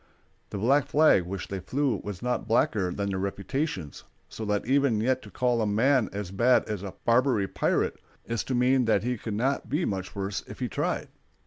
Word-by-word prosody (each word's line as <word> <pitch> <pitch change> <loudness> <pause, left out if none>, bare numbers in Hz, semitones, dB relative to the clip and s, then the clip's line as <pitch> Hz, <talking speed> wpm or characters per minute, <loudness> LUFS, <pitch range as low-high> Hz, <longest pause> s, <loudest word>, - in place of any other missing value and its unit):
The - - -5
black 135 +8 +3
flag 150 - +4
which 95 0 -5
they 95 - -3
flew 130 +8 0
was 100 -2 -6
not 125 -2 -1
blacker 110 -4 +2
than 100 +2 -2
their 95 - -2
reputations, 100 - -3 0.2
so 110 - -7
that 105 -1 0
even 135 -3 +2
yet 130 +3 +1
to - - -12
call 125 -2 +1
a 110 - +1
man 120 +4 +3
as 100 -2 -5
bad 120 +6 +3
as 105 -4 -3
a 100 -2 -7
Barbary 120 -4 +3
pirate - - 0 0.3
is 115 -2 -2
to 130 - -1
mean 125 +1 +3
that 105 -3 +2
he 125 +1 0
could 110 -1 -5
not 135 +6 -1
be 155 +5 0
much 95 -2 -4
worse 100 0 -3
if - - -9
he - - -2
tried. - - -2
110 Hz, 205 wpm, -27 LUFS, 100-130 Hz, 0.3 s, flag